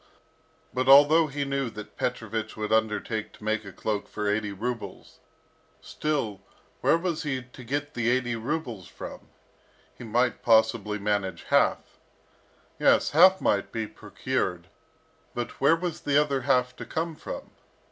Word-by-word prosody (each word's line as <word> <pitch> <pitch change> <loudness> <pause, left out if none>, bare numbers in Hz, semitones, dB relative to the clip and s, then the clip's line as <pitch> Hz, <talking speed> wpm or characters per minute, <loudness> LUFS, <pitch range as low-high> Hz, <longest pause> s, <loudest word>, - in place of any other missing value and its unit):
But 130 +1 0
although 145 +4 +7
he 140 0 -3
knew 140 -2 -1
that 105 -1 -10
Petrovich 110 -3 -3
would 110 0 -1
undertake 110 0 0
to - - -16
make 110 0 0
a 100 - -9
cloak 105 +1 -3
for 105 -1 -4
eighty 105 0 0
rubles, 115 +4 -6 0.6
still, 125 -10 -2 0.4
where - - +4
was 170 -2 -2
he 130 -4 -2
to 125 +1 -13
get 145 +4 -3
the 120 -1 0
eighty 120 -1 +1
rubles 120 - -4
from? - - -10 0.7
He - - -11
might 120 +2 0
possibly 110 -2 +3
manage 100 -2 -1
half. - - +1 0.8
Yes, - - +4
half 185 +5 +7
might 100 - +1
be 115 -1 -2
procured, 100 -5 -3 0.7
but 120 -1 -5
where 140 +4 +6
was 175 0 -4
the 145 0 +3
other 140 -3 +1
half 125 -1 +1
to - - -7
come 165 +1 -2
from? - - -8
120 Hz, 145 wpm, -27 LUFS, 110-140 Hz, 0.8 s, although